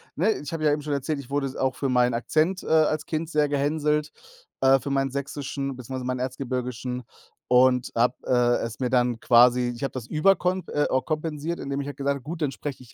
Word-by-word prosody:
ne, 190 +8 +2
ich 145 +2 -7
habe 160 -1 -3
ja 150 - +5
eben 150 - -2
schon 150 0 -2
erzählt, 140 +2 -2
ich 135 -2 -10
wurde 140 0 0
s 130 - -8
auch 130 0 0
für 135 - -2
meinen 125 -1 +3
Akzent, 160 +9 0
äh, - - -9
als 155 -1 +2
Kind 160 0 -3
sehr 150 -2 +2
gehänselt, 150 +1 0 0.5
äh, 135 0 +5
für 140 - -5
meinen 135 -1 0
Sächsischen 140 0 -4
beziehungsweise 130 +1 -6
meinen 125 0 -2
Erzgebirgischen 125 -1 -3 0.5
und 125 0 +4
habe, 120 +2 +3
äh, 120 -1 +3
es 115 -1 -7
mir 125 -2 0
dann 125 -2 +2
quasi 120 +1 +5
ich 120 - -8
habe 135 - -1
das 130 -4 -5
überkonp 180 +4 +2
äh, 145 - +1 0.2
kompensiert, 155 +1 -3
indem 140 0 -3
ich 140 - -6
halt 145 - -7
gesagt 140 0 0
habe: 140 - -8
„Gut, 165 +3 -6
dann 145 - 0
spreche 135 -2 -6
ich 120 - -18
140 Hz, 225 wpm, -25 LUFS, 125-150 Hz, 0.5 s, ja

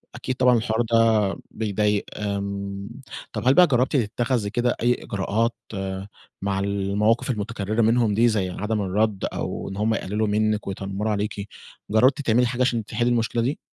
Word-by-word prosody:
أكيد 130 - -3
طبعًا 125 -1 +4
الحوار 110 0 0
ده 110 -3 +3 0.2
بيضايق 105 -1 0
آمم، 100 -1 -4 0.4
طب - - -3
هل 130 - +7
بقى 180 +3 +7
جرّبتِ 130 +1 +1
تتخذي 120 -1 0
كده 120 +2 0
أي 120 +1 +4
إجراءات 115 +4 -1 0.2
آآ 95 0 -4 0.3
مع 100 0 -1
المواقف 100 +4 +1
المُتكرِّرة 110 -1 -1
منهم 115 -1 +3
دي، 115 +4 +4
زي 105 -5 +1
عدم 105 +3 -2
الرَّدّ، 100 +1 0
أو - - -4
إن 95 - -7
هُم 110 +2 +1
يقلّلوا 105 +1 -1
منِك، 105 0 0
ويتنمّروا 100 +2 -3
عليكِ؟ 105 0 -2 0.4
جَرّبتِ 130 +7 +4
تعملي 125 -1 +3
حاجة 125 +1 -3
عشان 120 -4 +1
تحِلِّي 120 +2 0
المُشكلة 115 0 +1
دي؟ 130 +6 -1
110 Hz, 160 wpm, -24 LUFS, 100-120 Hz, 0.4 s, هل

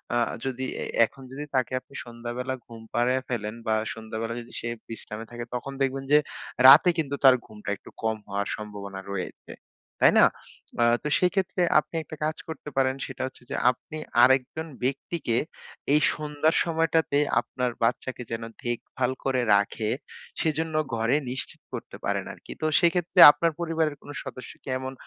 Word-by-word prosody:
আ - - +3 0.3
যদি 130 0 -2 0.2
এ - - -2 0.2
এখন 135 - -14
যদি 140 +2 -6
তাকে 130 -1 +1
আপনি 135 - -23
সন্ধ্যাবেলা 120 +2 -5
ঘুম 115 -1 -11
পাড়ায়া 125 +2 +2
ফেলেন 110 -3 -3
বা 110 - +3 0.2
সন্ধ্যাবেলা 110 +1 -5
যদি 120 - -14
সে - - -5 0.2
বিশ্রামে 115 -1 -7
থাকে 120 0 -6
তখন 135 +3 -4
দেখবেন 135 0 0
যে 150 - +8 0.5
রাতে 150 +7 +10
কিন্তু 140 -3 -1
তার 130 -2 +9
ঘুমটা 105 -1 -9
একটু - - -15
কম 110 0 +1
হওয়ার 100 0 -2
সম্ভাবনা 100 -2 -7
রয়েছে। 95 -2 -6 0.5
তাই - - +7
না? - - +9 0.6
আ - - +6 0.2
তো - - -2
সেইক্ষেত্রে 185 0 +1 0.2
আপনি 155 - -8
একটা 155 - -9
কাজ 155 +1 -2
করতে 160 -2 -7
পারেন 130 -1 +3
সেটা - - -7
হচ্ছে 130 - -13
যে - - -1 0.2
আপনি 125 +5 -10 0.3
আরেকজন 130 +5 +3 0.2
ব্যক্তিকে 130 -1 -1 0.6
এই 150 - +5
সন্ধ্যার 150 +1 0
সময়টাতে 165 -3 +1 0.2
আপনার 125 +1 -2
বাচ্চাকে 125 +2 -1
যেন 115 0 -3 0.2
দেখভাল 120 +1 -2
করে 130 -2 +2
রাখে 100 +2 0 0.5
সেজন্য 160 0 -1 0.2
ঘরে 115 +3 +2 0.2
নিশ্চিত 130 - -5
করতে - - -6
পারেন - - -1
আরকি। - - -13
তো - - 0
সেক্ষেত্রে 175 0 +2
আপনার 165 +3 0
পরিবারের 160 -3 0
কোন - - -14
সদস্য 130 - -8
কি - - -19
এমন 130 0 -5
130 Hz, 165 wpm, -26 LUFS, 115-150 Hz, 0.6 s, রাতে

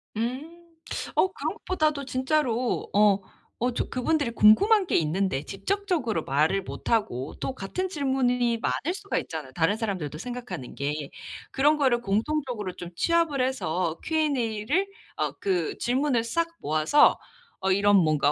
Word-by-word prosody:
음. 310 +9 -5 0.4
어 375 - +3
그런 - - -3
것보다도 305 -6 -1
진짜로 255 -2 0
어 205 -1 +4 0.4
어 250 +2 +1
저 - - -2
그분들이 285 +1 0
궁금한 375 - +5
게 - - 0
있는데 165 -2 0
직접적으로 250 - -2
말을 155 +8 +1
못 - - -7
하고 170 - 0
또 265 - -3
같은 365 - -3
질문이 250 -6 +1
많을 305 +8 -1
수가 400 +1 -3
있잖아요 155 -5 -6
다른 170 +8 +1
사람들도 185 - -3
생각하는 200 - -6
게. 145 +1 -3 0.4
그런 295 +3 +3
거를 260 -5 +2
공통적으로 225 -2 -1
좀 175 -1 -8
취합을 335 - +2
해서 180 -10 -1
Q&A를 285 - 0 0.3
어 - - -1
그 180 -5 -1
질문을 250 -1 +1
싹 335 +8 0
모아서 155 - +4 0.4
어 190 0 +1
이런 200 +1 +4
뭔가 155 -5 +3
235 Hz, 300 characters per minute, -26 LUFS, 190-295 Hz, 0.4 s, 궁금한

